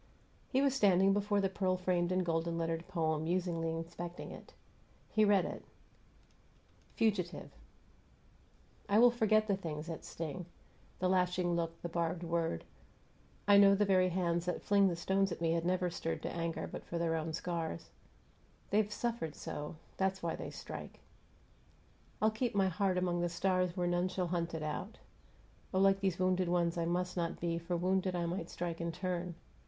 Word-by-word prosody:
He 265 +1 +2
was 275 -2 +3
standing 195 -6 +4
before 205 0 +1
the 195 - +2
pearl 185 -1 0
framed 180 -1 +1
and 185 0 +1
golden 165 0 0
lettered 165 0 -2
poem, 160 -4 0
musingly 170 -1 0
inspecting 170 +1 -5
it. - - -11 0.6
He 215 - +4
read 205 -3 +4
it: - - -6 1.3
FUGITIVE 195 -6 0 1.4
I 200 - +4
will 240 +2 +8
forget 215 -2 +3
the 200 - +2
things 155 -5 -5
that 165 -1 -6
sting: 165 +2 -5 0.5
The 185 - +1
lashing 180 -1 +2
look, 165 -1 -2
the - - -1
barbed 170 +1 -1
word. 165 - -1 0.8
I 200 0 +8
know 200 0 +7
the 205 +1 +3
very 185 -2 +4
hands 175 -1 0
that 180 - -2
fling 200 -1 +4
The 175 - 0
stones 190 +3 +1
at - - -4
me 165 -1 +1
had 165 0 0
never 180 -1 +1
stirred 165 -1 -3
To - - -2
anger 165 -1 -2
but - - -7
for 170 - -4
their 165 -1 +1
own 160 0 -2
scars. 165 - -4 0.8
They've 210 0 +2
suffered 225 -10 -2
so, 150 +2 -5 0.2
that's 190 -1 0
why 165 - -1
they - - -6
strike. - - -8 1.2
I'll 215 +1 +3
keep 220 0 -2
my 195 -1 +3
heart 185 +1 +1
among 175 -1 +1
the 175 - +1
stars 185 0 0
Where 180 - +1
none 175 +1 +1
shall 185 -1 -2
hunt 170 -1 -1
it 160 - -4
out. 155 +8 -4 0.7
Oh, 190 - +1
like 195 0 +5
These 190 -3 0
wounded 185 -1 +2
ones 170 -1 +2
I 170 -1 0
must 180 +1 -1
not 170 -2 -2
be, 170 -1 -1
For, 170 +1 -2
wounded, 185 +1 +1
I 175 -1 0
might 170 0 -3
strike 170 -1 -4
in 170 0 -1
turn! 180 0 -3
180 Hz, 180 wpm, -34 LUFS, 170-190 Hz, 1.4 s, will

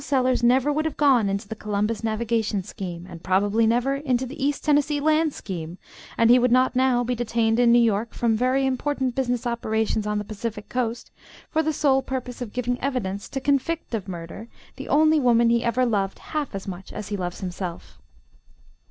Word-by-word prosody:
Sellers 255 -2 +1
never 260 +4 +3
would 310 +2 -1
have 315 - -3
gone 260 -8 +4
into 200 0 -3
the 220 - -6
Columbus 210 +1 -2
Navigation 220 -2 -1
scheme, 175 -2 -7
and 170 -2 -10
probably 205 +4 +2
never 245 +4 +1
into 260 -3 0
the 265 +2 -7
East 285 0 0
Tennessee 290 -1 +2
Land 310 +1 +2
scheme, 175 - -6 0.4
and 230 0 +5
he 250 - +7
would 250 0 +2
not 255 +1 +3
now 255 -1 +3
be 245 +1 -1
detained 230 -1 0
in 240 -1 +5
New 240 - +6
York 225 -1 +1
from 230 -2 +1
very 255 +4 +1
important 265 0 -1
business 245 -1 -1
operations 220 -2 -1
on 210 0 0
the 210 - -2
Pacific 210 0 -6
coast, 240 -2 -3 0.4
for 315 - +2
the 315 0 0
sole 275 -3 +2
purpose 255 -2 -5
of 235 -4 -5
giving 245 +1 -2
evidence 215 -8 -3
to 270 - -3
convict 285 +3 -1
of 210 -4 -3
murder 175 +4 -7 0.3
the - - -8
only 310 +1 +4
woman 235 -3 +4
he 235 0 +2
ever 245 +2 +1
loved 200 -5 -1
half 300 -8 -4
as 195 - -6
much 190 0 -7
as 210 -1 -7
he 205 - -2
loves 180 -2 -4
himself. 175 - -6
235 Hz, 195 wpm, -24 LUFS, 210-265 Hz, 0.4 s, he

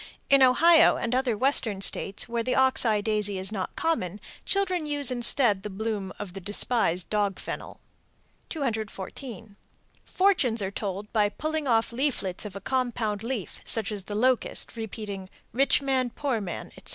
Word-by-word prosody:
_ - - -11 0.3
In 275 -1 +6
Ohio 325 +6 +6
and 235 0 -2
other 255 -4 0
Western 240 -5 +1
States 195 +2 +1
where 235 -1 -2
the 250 +2 -1
ox 265 -1 +4
eye 215 -2 +2
daisy 210 -2 +1
is 190 +1 -1
not 195 -4 -4
common, 210 - -1 0.3
children 370 -5 0
use 290 -3 +4
instead 240 -4 +3
the 210 - -6
bloom 205 -1 -4
of 180 - -7
the 195 - -7
despised 200 -2 0
dog 205 -2 0
fennel. - - -7 0.7
214. 220 - -5 0.5
Fortunes 360 - +2
are 190 - -3
told 200 0 -5
by 210 -2 +3
pulling 310 +4 -3
off 225 -2 +2
leaflets 235 -8 -1
of 200 -2 -7
a 195 - -7
compound 235 -4 -2
leaf, 230 -5 -5
such 220 -2 +2
as 200 -3 -5
the 205 - -5
locust, 250 +3 0
repeating, 210 -4 -6 0.2
"Rich 275 +3 +2
man, 260 -2 0
poor 250 -3 -2
man," 180 -4 -6
etc. - - -13
225 Hz, 165 wpm, -26 LUFS, 205-265 Hz, 0.7 s, In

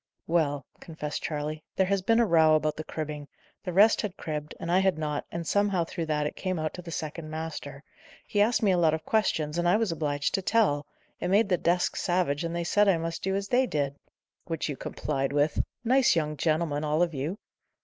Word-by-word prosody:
"Well," 145 -5 0
confessed 150 -3 -5
Charley, 155 0 -3
"there 190 - +3
has 195 0 +1
been 225 +5 +3
a 235 - +5
row 160 -5 +5
about 155 0 0
the 155 - -5
cribbing. 150 -2 -5 0.4
The 185 - -3
rest 205 +5 +5
had 200 -3 -5
cribbed, 150 -1 -5
and 170 - -3
I 180 - +5
had 190 -4 +2
not, 150 -2 -3
and 170 0 -4
somehow, 200 -1 +2
through 165 0 -5
that, 150 -1 0
it 150 - -3
came 185 -2 -2
out 155 -1 -2
to 180 - -7
the 175 - -10
second 160 -1 -5
master. 155 -3 -6 0.4
He 205 - +1
asked 225 +2 +2
me 200 - +4
a 180 - +2
lot 160 -2 +4
of 160 - -8
questions, 165 -7 0
and 175 0 +2
I 195 - +5
was 220 -5 0
obliged 145 -3 -1
to 195 - +1
tell. 185 -9 +2 0.3
It - - -2
made 200 +3 +3
the 180 - +3
desk 175 +1 +1
savage, 175 -5 0
and 170 0 -3
they 170 - -1
said 205 +4 +3
I 190 -4 +4
must 165 0 -4
do 190 0 -1
as 200 0 -3
they 255 +1 +3
did." 140 - -1 0.5
"Which 165 -2 -3
you 145 - -2
complied 135 +1 -3
with! 145 +1 +2 0.2
Nice 255 -1 +4
young 150 -2 0
gentlemen, 155 0 0
all 155 +3 +2
of 170 -2 -1
you!" 150 +8 -3
165 Hz, 225 wpm, -28 LUFS, 150-190 Hz, 0.5 s, a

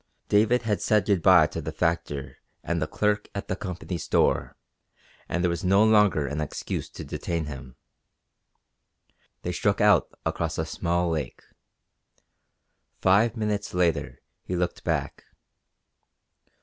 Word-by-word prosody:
David 110 +4 +3
had 105 -3 -1
said 105 -1 +2
good 100 -5 +2
bye 90 -2 +7
to 80 - -5
the 80 +1 -5
factor 75 -6 -2 0.2
and 85 -1 -2
the 75 - 0
clerk 105 +5 0
at 100 - -4
the 95 - -1
Company 90 -2 -5
store - - +1 0.7
and 85 +2 -1
there 90 - +3
was 85 +4 -4
no 95 +3 +4
longer 105 -8 +4
an 75 +2 -3
excuse 75 - -4
to - - -9
detain 85 -2 -3
him. 65 -4 -9 1.7
They - - -2
struck - - 0
out - - +4 0.2
across 85 -1 -2
a 80 - -1
small 85 +1 -1
lake. 75 -6 -4 1.6
Five 105 +5 +3
minutes 105 -3 -2
later 90 -2 0 0.2
he 90 - -3
looked 90 0 -2
back. - - -2
90 Hz, 135 wpm, -26 LUFS, 80-105 Hz, 1.7 s, bye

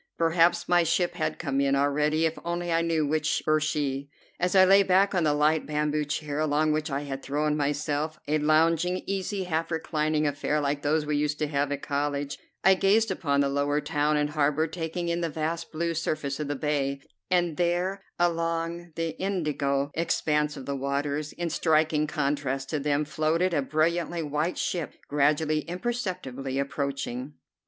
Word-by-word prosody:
Perhaps 165 +1 +3
my 175 0 +4
ship 175 +2 +1
had 155 0 -2
come 140 -3 -1
in 140 0 +2
already 150 +3 +2
if 160 0 -1
only 175 0 -2
I 165 0 +3
knew 165 -2 +1
which 155 +1 0
were 155 0 +3
she. 140 -2 -2 0.3
As 180 +2 0
I 190 -1 +8
lay 195 +1 +7
back 195 +1 +3
on 175 -4 +2
the 150 - +3
light 155 +1 +2
bamboo 150 0 0
chair, 145 0 -3
along 155 0 +2
which 155 0 -1
I 140 0 -2
had 135 -2 -5
thrown 150 +2 0
myself, 150 +1 -1
a 155 +1 +2
lounging, 165 +4 +2
easy, 195 0 -2
half 165 -2 -1
reclining 155 -2 0
affair 145 +1 0
like 145 0 -1
those 150 +1 +1
we 150 -1 0
used 150 0 0
to 150 - -1
have 145 -1 0
at 145 -1 -3
college, 145 -1 -2 0.2
I 190 - +7
gazed 200 +4 +3
upon 140 -5 +1
the 140 - +2
lower 145 +1 +1
town 150 0 0
and 150 0 0
harbor, 150 +1 +2
taking 165 +1 -4
in 170 0 -1
the 170 - -1
vast 160 +2 -3
blue 170 +1 -1
surface 155 -3 -2
of 150 - -2
the 145 - -2
bay; 140 -1 -1 0.3
and 175 -3 +1
there 180 +3 0 0.2
along 170 0 -1
the 165 0 -1
indigo 145 -7 0
expanse 150 -2 0
of 135 - -8
the 140 - -2
waters, 140 +2 -2
in 170 -1 -3
striking 155 -1 +2
contrast 140 -3 -1
to 155 - 0
them, 145 +1 0
floated 160 +4 0
a 145 - +2
brilliantly 165 +4 0
white 150 +4 -1
ship 170 -4 -2
gradually, 150 +2 +2
imperceptibly 175 - -4
approaching. 140 -1 -3
155 Hz, 180 wpm, -27 LUFS, 145-170 Hz, 0.3 s, I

